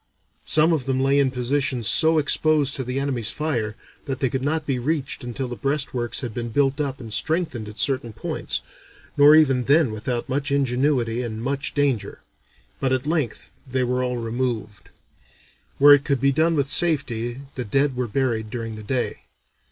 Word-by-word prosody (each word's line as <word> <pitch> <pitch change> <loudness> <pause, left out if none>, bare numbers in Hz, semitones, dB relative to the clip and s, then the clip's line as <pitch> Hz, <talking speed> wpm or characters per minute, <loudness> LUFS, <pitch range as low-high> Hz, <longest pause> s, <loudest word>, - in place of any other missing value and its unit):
Some 155 +2 +4
of 145 -6 -1
them 135 -1 0
lay 135 +1 +3
in 135 -2 +3
positions 130 -1 -1
so 160 0 +4
exposed 150 -1 +2
to 130 - -3
the 125 +2 -3
enemy's 130 -6 +1
fire 120 -9 -2 0.3
that 135 -3 -4
they 130 -4 0
could 130 - -2
not 155 +3 -1
be 135 -4 -1
reached 140 0 -2
until 125 +2 -4
the 120 - -6
breastworks 135 -3 -2
had 120 -4 -5
been 120 0 -4
built 140 +4 +1
up 135 -2 -3
and 115 -4 -7
strengthened 125 -4 -1
at 105 - -12
certain 130 -4 0
points, 110 - -3 0.5
nor 145 +1 +7
even 135 -5 +4
then 145 -3 +4
without 120 +3 -3
much 140 +1 -2
ingenuity 125 -3 +1
and 115 -2 -5
much 140 +2 -2
danger; 140 -6 -1 0.6
but 135 - 0
at 130 +1 0
length 150 -7 -2 0.2
they 130 0 +1
were 125 +1 0
all 125 -1 -2
removed. 115 -3 -4 0.9
Where 145 +1 +8
it 145 -1 +4
could 140 -2 0
be 140 +2 +3
done 160 +4 +2
with 140 -2 +1
safety, 130 -7 +1
the 125 - -4
dead 135 +5 +1
were 125 -1 -2
buried 115 -2 -1
during 115 -1 -5
the - - -8
day. 125 +4 -2
130 Hz, 185 wpm, -23 LUFS, 120-145 Hz, 0.9 s, Where